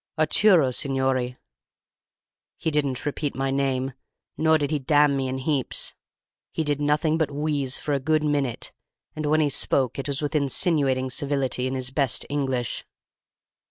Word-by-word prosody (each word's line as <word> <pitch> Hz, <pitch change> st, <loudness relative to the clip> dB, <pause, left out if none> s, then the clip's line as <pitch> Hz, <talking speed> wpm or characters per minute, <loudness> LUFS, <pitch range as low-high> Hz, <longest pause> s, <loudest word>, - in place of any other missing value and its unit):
"'Arturo, 155 Hz, -1 st, +4 dB
signorì.' 130 Hz, -2 st, 0 dB, 1.2 s
"He 160 Hz, -, -1 dB
didn't 140 Hz, -3 st, -1 dB
repeat 145 Hz, 0 st, -2 dB
my 135 Hz, 0 st, -1 dB
name, 135 Hz, -1 st, 0 dB, 0.4 s
nor 160 Hz, 0 st, +3 dB
did 145 Hz, -1 st, -2 dB
he 150 Hz, -, +1 dB
damn 145 Hz, +1 st, +3 dB
me 135 Hz, -1 st, -1 dB
in 130 Hz, +1 st, -3 dB
heaps. 135 Hz, -1 st, -1 dB, 0.6 s
He 160 Hz, -, -1 dB
did 145 Hz, -1 st, -1 dB
nothing 150 Hz, +2 st, +1 dB
but 160 Hz, -, +1 dB
wheeze 145 Hz, -2 st, -1 dB
for 150 Hz, -, -2 dB
a 140 Hz, -, +1 dB
good 155 Hz, +3 st, +1 dB
minute, 145 Hz, -5 st, -1 dB, 0.4 s
and 155 Hz, -1 st, -2 dB
when 155 Hz, +1 st, +3 dB
he 150 Hz, -, +2 dB
spoke 130 Hz, -2 st, +1 dB
it 135 Hz, -, -3 dB
was 140 Hz, -1 st, -2 dB
with 150 Hz, +1 st, -3 dB
insinuating 140 Hz, -3 st, +1 dB
civility, 135 Hz, -2 st, 0 dB
in 130 Hz, -, -3 dB
his 130 Hz, 0 st, -3 dB
best 135 Hz, -3 st, +1 dB
English. 130 Hz, -4 st, -2 dB
140 Hz, 160 wpm, -25 LUFS, 130-150 Hz, 1.2 s, Arturo